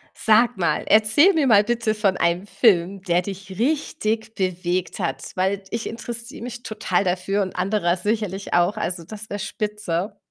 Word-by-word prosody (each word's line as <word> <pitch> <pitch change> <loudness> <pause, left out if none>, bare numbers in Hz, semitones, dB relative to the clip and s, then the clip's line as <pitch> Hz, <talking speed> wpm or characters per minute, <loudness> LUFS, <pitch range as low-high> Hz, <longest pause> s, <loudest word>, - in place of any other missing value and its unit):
Sag 225 +1 +3
mal, 175 - 0
erzähl 220 - +5
mir 315 -6 +2
mal 210 -4 +6
bitte 230 -1 0
von 200 -3 +1
einem 170 +3 +1
Film, 195 -2 +2
der 175 -2 +1
dich 195 0 -7
richtig 225 -5 -1
bewegt 185 -2 -2
hat. - - -2
Weil 190 +2 0
ich 230 0 -3
interessiere 235 0 -7
mich 240 0 -7
total 210 -5 -1
dafür 185 +2 0
und 190 - -5
anderer 180 -2 +1
sicherlich 205 -1 -2
auch, 175 +3 +3
also, 175 -2 -3
das 210 +4 -10
wär 205 - -3
spitze. 210 -2 -3
205 Hz, 165 wpm, -23 LUFS, 185-220 Hz, -, mal